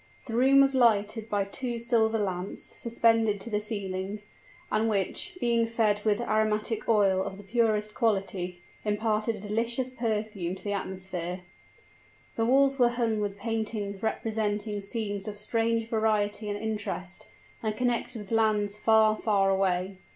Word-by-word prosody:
The 230 - -4
room 270 +3 +6
was 275 0 +4
lighted 225 -3 +2
by 205 -1 +1
two 240 +4 -3
silver 230 -1 +2
lamps 190 -2 -2
suspended 225 -3 +1
to 235 - -7
the 210 - +1
ceiling, 200 -1 -4 0.5
and 220 +1 +2
which, 200 - -1
being 235 -3 +2
fed 215 -3 +1
with 210 -1 +2
aromatic 215 -1 0
oil 200 -4 +4
of 190 0 -4
the 205 - -11
purest 215 0 +1
quality, 190 -5 -1 0.2
imparted 215 +1 0
a - - -8
delicious 235 +5 -1
perfume 215 -7 -2
to - - -12
the 205 - -2
atmosphere. 185 -2 -4 0.9
The 225 0 +1
walls 275 +1 +4
were 240 -1 +6
hung 235 -3 0
with 205 -1 -2
paintings 210 -2 -3
representing 210 -2 -1
scenes 205 -1 -3
of 210 -1 -5
strange 225 +1 0
variety 215 -2 0
and 205 - -2
interest, 210 -4 -4 0.3
and 215 -1 -2
connected 245 -1 0
with 210 -1 -9
lands 210 -2 +2
far 220 0 +5
far 200 -3 +2
away. 190 0 0
215 Hz, 150 wpm, -28 LUFS, 200-230 Hz, 0.9 s, room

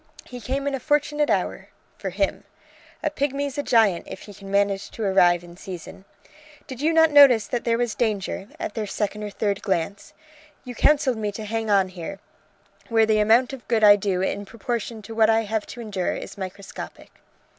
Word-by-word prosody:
He 245 -1 -9
came 275 +4 -3
in 285 - -1
a 270 - -2
fortunate 295 +1 +1
hour... - - -1 0.3
for - - -5
him. - - -1 0.6
A 305 - 0
pigmy's 285 0 -2
a - - +2
giant 220 -10 +2
if - - -8
he 205 - -11
can 195 0 -11
manage 200 0 +1
to 225 - -6
arrive 175 -3 +4
in 175 0 -13
season. 185 0 -9 0.6
Did 260 -1 -8
you 315 +2 +2
not 320 -1 +5
notice 275 -6 +7
that 240 -2 -3
there 230 -1 +2
was 240 -2 -1
danger, 210 -4 -2
at - - -4
their 215 -2 -3
second 210 +1 -3
or 210 - -4
third 205 0 -2
glance? 195 +1 -3 0.5
You 250 - -7
counselled 280 -2 +3
me 210 -1 -2
to 215 +1 -6
hang 225 +1 -3
on 195 -2 +3
here, 185 +1 -7 0.7
where 225 -1 +4
the 215 -1 +2
amount 230 +5 +4
of 265 - -9
good 225 -2 +1
I 205 -1 +9
do 195 -2 -1
in 200 - -2
proportion 230 +1 -5
to 225 - -8
what 220 -1 +4
I 225 0 +4
have 220 0 -3
to 240 - -8
endure 200 -5 -2
is - - -8
microscopic." 195 0 -8
220 Hz, 200 wpm, -24 LUFS, 200-245 Hz, 0.7 s, I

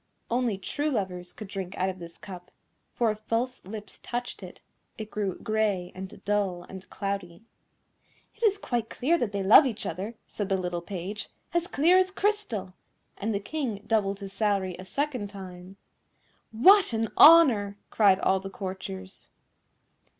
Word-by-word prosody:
Only 240 -4 +1
true 290 +10 -2
lovers 180 -8 -3
could 215 - -9
drink 190 -2 -6
out 185 +1 +1
of 185 0 -6
this 170 -1 -10
cup, 180 -2 -10 0.4
for 230 -2 +1
if 210 - -7
false 235 +4 -2
lips 210 +2 -8
touched 245 0 -5
it, - - -10 0.4
it 215 -1 -7
grew 200 -3 -2
grey 210 -5 -1
and 190 0 -9
dull 200 -4 0
and 190 +1 -11
cloudy. 195 -2 -4 0.9
"It - - -25
is 420 -3 +4
quite 240 - -2
clear 330 +7 +1
that 230 -4 -1
they 200 -1 -2
love 220 +9 +8
each 225 -5 -4
other," 195 +7 -4
said 205 -2 -5
the 195 - +2
little 175 -2 -3
Page, 190 +3 -6 0.2
"as 345 0 +1
clear 340 +6 +4
as 375 0 +2
crystal!" 380 - -1 0.4
and 215 +3 -2
the 200 - 0
King 225 -3 -4
doubled 200 -3 0
his 195 -1 -7
salary 195 -3 0
a 185 - -8
second 260 -1 -2
time. 190 -1 -10 0.7
"What 365 - +6
an 225 -1 0
honour!" 250 -12 +7
cried 200 -3 +5
all 190 - +3
the 195 +1 -7
courtiers. 190 0 -7
205 Hz, 165 wpm, -27 LUFS, 190-240 Hz, 0.9 s, love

